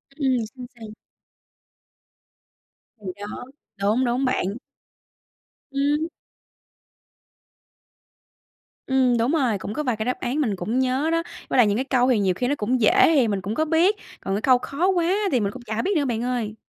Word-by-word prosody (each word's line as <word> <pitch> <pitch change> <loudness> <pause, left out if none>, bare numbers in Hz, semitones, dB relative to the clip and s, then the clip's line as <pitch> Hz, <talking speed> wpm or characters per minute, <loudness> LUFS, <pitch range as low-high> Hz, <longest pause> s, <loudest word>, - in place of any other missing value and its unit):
Ừm. 265 -4 +1 0.2
Sao, 255 -1 -8
sao? 220 - -8 2.1
Thì 200 - -9
đó, 205 +3 -7 0.4
đúng, 215 +6 +2
đúng 250 +3 0
bạn. 255 -7 0 1.3
Ừm. 290 +3 0 2.8
Ừm, 260 -2 +3
đúng 235 +4 +1
rồi. 260 -10 +1
Cũng 205 - -5
có 300 - -2
vài 250 -4 0
cái 220 - -3
đáp 250 - -2
án 270 +5 -1
mình 220 -8 0
cũng 215 +8 -2
nhớ 260 +4 +1
đó, 330 0 +1 0.3
với - - 0
lại 240 -4 +6
những 205 0 +1
cái 260 - -1
câu 255 -2 +2
thì 240 - +3
nhiều 190 -2 +2
khi 245 +7 -2
nó 285 - +1
cũng 245 0 -1
dễ 220 +8 +5
hì 260 -5 +4
mình 200 -3 -1
cũng 205 +4 -4
có 315 - +1
biết, 335 +6 +3 0.3
còn 195 - -2
cái 210 - -2
câu 255 +1 +5
khó 285 +8 -2
quá 355 -1 +2 0.2
thì 255 - +2
mình 200 -2 -1
cũng - - -10
chả 220 -1 -3
biết 390 +2 0
nữa, 285 - +1
bạn 235 -2 -2
ơi. 240 -4 -2
250 Hz, 185 wpm, -23 LUFS, 220-280 Hz, 2.8 s, lại